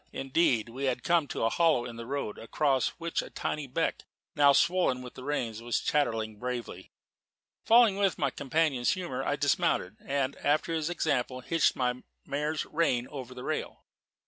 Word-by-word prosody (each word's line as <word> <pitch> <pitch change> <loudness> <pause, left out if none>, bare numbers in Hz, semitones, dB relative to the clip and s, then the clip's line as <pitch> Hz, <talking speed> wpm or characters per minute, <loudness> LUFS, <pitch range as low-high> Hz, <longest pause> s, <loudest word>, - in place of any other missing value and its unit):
Indeed, 135 -5 +1
we 130 +4 -5
had 130 -2 -1
come 170 -4 +2
to - - -3
a 115 - +3
hollow 160 -8 +3
in 120 - -7
the 115 0 -8
road, 135 -6 -3
across 135 +2 +1
which 170 0 -2
a - - -9
tiny 150 -2 -3
beck, 150 +6 -2 0.3
now 145 -2 +6
swollen 170 -5 +2
with 125 - -9
the 130 - -10
rains, 120 -6 -2
was 120 0 0
chattering 110 -7 0
bravely. 120 -7 -5 0.7
Falling 230 -3 +6
in - - -2
with 195 -2 +2
my 140 -3 0
companion's 140 -2 +1
humour, 175 -8 -4
I - - 0
dismounted, 95 +4 +1
and, 140 0 -1
after 155 +3 +1
his 160 0 -1
example, 135 -7 -1
hitched 165 +5 +2
my 125 -1 -1 0.2
mare's 150 +2 -2
rein 140 -7 0
over 130 -3 -8
the 125 - -8
rail. - - -4
135 Hz, 175 wpm, -29 LUFS, 125-160 Hz, 0.7 s, now